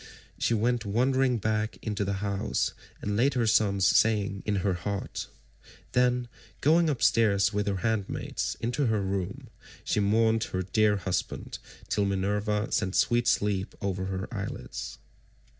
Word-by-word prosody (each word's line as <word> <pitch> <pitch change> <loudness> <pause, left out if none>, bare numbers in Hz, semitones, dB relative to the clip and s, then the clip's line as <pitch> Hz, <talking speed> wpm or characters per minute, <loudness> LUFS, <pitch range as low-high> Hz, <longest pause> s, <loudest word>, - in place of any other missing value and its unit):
She 120 - +2
went 120 +2 +1
wondering 125 +4 +2
back 110 0 -1
into 105 -2 -1
the 100 0 -1
house, 100 -1 -1 0.3
and 105 0 -1
laid 130 +5 +2
her 120 -2 +2
son's 100 -3 +3
saying 105 -2 +3
in 105 - +1
her 95 - +2
heart. 100 +3 -4 0.6
Then 125 0 +2 0.3
going 160 +3 +4
upstairs 105 -6 +3
with 105 0 -1
her 100 - +1
handmaids 110 -3 -2
into 125 +4 0
her 110 -3 +1
room, 95 -2 -4 0.3
she - - 0
mourned 110 +2 +3
her 95 0 -3
dear 105 +2 +2
husband 95 -1 -3 0.3
till 100 0 +1
Minerva 105 +2 0
sent 100 -2 0
sweet 120 0 +2
sleep 100 -3 +1
over 95 -1 -2
her 95 0 -3
eyelids. - - -5
105 Hz, 140 wpm, -28 LUFS, 100-115 Hz, 0.6 s, going